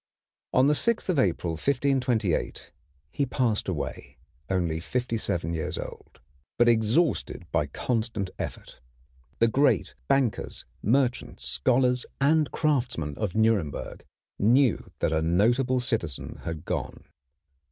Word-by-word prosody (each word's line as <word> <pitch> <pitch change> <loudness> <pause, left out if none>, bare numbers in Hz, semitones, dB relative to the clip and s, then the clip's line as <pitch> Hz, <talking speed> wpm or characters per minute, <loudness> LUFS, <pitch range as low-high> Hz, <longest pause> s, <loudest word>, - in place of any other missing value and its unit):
On 130 - +4
the 145 - +4
6th 230 +6 0
of 170 -6 +2
April, 90 -5 +1
1528, 125 - 0 0.4
he 140 - 0
passed 115 -5 0
away, 85 -7 -5 0.3
only 85 -4 0
fifty 120 +7 -2
seven 85 -6 -2
years 80 -2 -3
old, - - -9 0.4
but 120 - +4
exhausted 115 - +2
by 75 -3 +1
constant 110 - -2
effort. - - -6 0.6
The 115 - +4
great 140 +6 +2
bankers, 135 -5 0 0.2
merchants, 125 +3 0
scholars, 125 - +2
and 150 +2 +3
craftsmen 125 - 0
of 105 -3 -2
Nuremberg 110 -9 0 0.4
knew 120 +3 +3
that 80 - +1
a 80 - +2
notable 120 +10 +2
citizen 110 - -2
had 80 -2 -5
gone. - - -4
115 Hz, 120 wpm, -27 LUFS, 90-130 Hz, 0.6 s, On